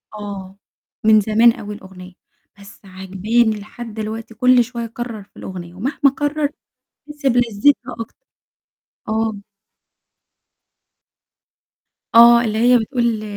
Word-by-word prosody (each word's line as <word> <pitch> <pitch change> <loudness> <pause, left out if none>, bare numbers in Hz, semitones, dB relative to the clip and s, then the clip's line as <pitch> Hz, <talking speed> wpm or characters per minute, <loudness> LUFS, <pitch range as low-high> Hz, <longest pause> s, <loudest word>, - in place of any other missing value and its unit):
آه 200 -2 -8 0.5
من 215 -1 +6
زمان 225 +3 +4
أوي 210 0 -8
الأغنية. 185 -2 -13 0.5
بس 200 0 -16
عاجباني 200 +4 -1
لحد 225 +2 -10
دلوقتي 220 +1 -6
كل 250 +1 +4
شوية 235 -1 -6
أكرر 230 -3 -7
في - - -25
الأغنية 175 -2 -8
ومهما 245 +10 -4
أكرر 290 +2 +1 0.6
أحس 295 -1 -11
بلذتها 245 +1 +2
أكتر. 230 - -9 0.8
آه. 220 -1 -1 2.8
آه 235 +1 +8
اللي 215 -1 -2
هي 245 +2 +5
بتقول: 235 -2 -1
225 Hz, 110 wpm, -19 LUFS, 205-240 Hz, 2.8 s, آه